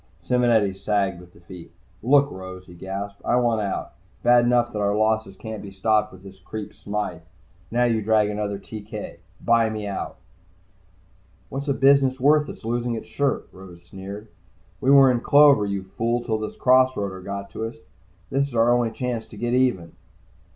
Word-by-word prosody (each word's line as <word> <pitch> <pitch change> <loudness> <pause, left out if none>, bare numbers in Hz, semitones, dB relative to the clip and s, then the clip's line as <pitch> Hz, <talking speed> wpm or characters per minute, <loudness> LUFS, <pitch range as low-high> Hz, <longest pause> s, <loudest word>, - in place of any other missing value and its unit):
Simonetti 120 -5 +2
sagged 100 -2 -1
with 90 0 -15
defeat. 85 0 -13 0.3
"Look, 140 +4 +4
Rose," 95 0 -9
he 90 - -14
gasped. 100 +3 -6
"I - - +1
want 120 -3 +2
out. 100 -2 -3 0.3
Bad 120 0 +5
enough 120 0 +2
that 105 - -3
our 100 0 +1
losses 110 -2 0
can't 110 -1 -7
be 100 - -8
stopped 105 +2 +1
by 95 - -13
this 95 0 -14
creep 105 +3 -7
Smythe. 100 -5 -4 0.5
Now 120 +1 +1
you 115 -2 +1
drag 110 0 +3
in 105 0 -4
another 100 -1 -2
TK. 105 +1 -8 0.2
Buy 115 -1 +3
me 110 -1 -5
out!" 100 -2 -5 1.3
"What's 140 +2 -5
a 140 - +2
business 135 -1 +4
worth 150 +2 +4
that's - - -10
losing 120 +1 -1
its 110 - -6
shirt?" 140 -2 -1
Rose 90 -2 -13
sneered. 100 +4 -9 0.5
"We 130 - 0
were 135 -1 +7
in 120 - 0
clover, 140 -8 +5
you 100 -1 -3
fool, 115 +5 -2
till 110 -2 -1
this 110 - -5
cross 130 0 +4
roader 95 -2 -4
got 100 0 -6
to 110 - -4
us. 115 - -6 0.6
This 140 +1 +1
is 130 - -10
our 115 +1 +4
only 120 -1 +2
chance 120 0 -4
to 110 - -13
get 120 +3 -2
even." 125 -10 +1
110 Hz, 185 wpm, -23 LUFS, 100-120 Hz, 1.3 s, were